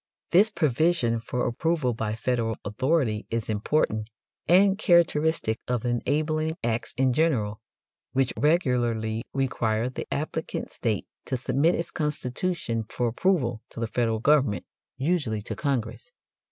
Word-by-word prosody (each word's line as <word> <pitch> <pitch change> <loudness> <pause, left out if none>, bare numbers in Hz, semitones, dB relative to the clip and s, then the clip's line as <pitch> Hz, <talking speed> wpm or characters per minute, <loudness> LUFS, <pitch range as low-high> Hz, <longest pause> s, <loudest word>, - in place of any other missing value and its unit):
This 200 +5 +6
provision 155 - +2
for 125 +2 -2
approval 145 0 0
by 110 -1 -2
Federal 115 -1 -1
authority 120 0 0
is 115 -1 -2
important 110 -1 0 0.4
and 190 +3 +5
characteristic 160 - +2
of 125 -1 -1
enabling 155 +6 0
acts 115 0 -2
in 130 -1 +3
general, 120 -9 +1 0.5
which 130 -2 +1
regularly 120 -8 +1
require 120 -3 0
the 130 - -7
applicant 155 +2 -3
state 110 -5 -1 0.2
to 130 - -1
submit 135 +7 +2
its 170 - -3
constitution 150 -4 -2
for 120 -1 -1
approval 125 - +1
to - - -9
the 115 - 0
Federal 115 0 0
government, 125 -6 +2 0.3
usually 135 -9 0
to - - -4
Congress. 140 - -2
125 Hz, 125 wpm, -26 LUFS, 115-155 Hz, 0.5 s, This